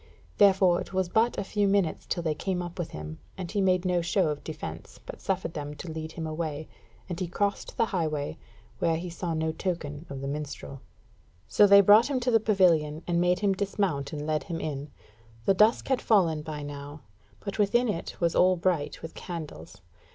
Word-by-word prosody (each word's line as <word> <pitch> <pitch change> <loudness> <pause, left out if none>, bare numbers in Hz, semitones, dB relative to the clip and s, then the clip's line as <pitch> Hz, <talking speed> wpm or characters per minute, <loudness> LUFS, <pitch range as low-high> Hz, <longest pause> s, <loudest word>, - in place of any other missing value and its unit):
Therefore 190 -3 +5
it - - -9
was 185 -2 0
but 225 +5 +2
a - - -1
few 205 +1 0
minutes 195 -5 +1
till 175 - -2
they 160 -2 +1
came 185 +4 -2
up 175 +1 -8
with 170 - -2
him, 75 +1 -8 0.2
and 180 -2 -5
he 205 -1 0
made 185 -1 +2
no 180 -1 +2
show 175 0 +1
of 150 -1 -4
defence, 85 - -7
but - - -9
suffered 185 -3 -2
them 150 0 -5
to 160 +3 -7
lead 160 0 -6
him 160 - -5
away, 155 -1 -4 0.4
and 175 -3 -5
he 185 - -2
crossed 200 +3 -2
the - - +3
highway, 155 -8 -2 0.4
where 165 - +2
he 175 +1 -5
saw 170 -1 -3
no 160 0 0
token 160 -3 -4
of 135 -1 -6
the 135 - -4
minstrel. 140 -2 -6 0.7
So 205 - +5
they 200 0 +9
brought 210 +6 +6
him 270 -3 0
to 250 +1 +1
the 225 - +5
pavilion, 170 -7 +2
and 175 -1 +1
made 180 +2 +2
him 200 -2 +3
dismount 190 -7 -1
and 150 -2 -4
led 155 -1 0
him 165 -1 -4
in. 145 -1 -4 0.6
The 195 - +5
dusk 215 +5 +3
had 265 -2 +1
fallen 170 -8 +3
by 150 -1 -6
now, 145 +1 -8 0.4
but 200 +1 -6
within 240 +5 +3
it 175 -6 -4
was 170 -1 +1
all 185 0 +5
bright 170 -4 -1
with 160 - -7
candles. 155 - -8
175 Hz, 205 wpm, -28 LUFS, 155-195 Hz, 0.7 s, they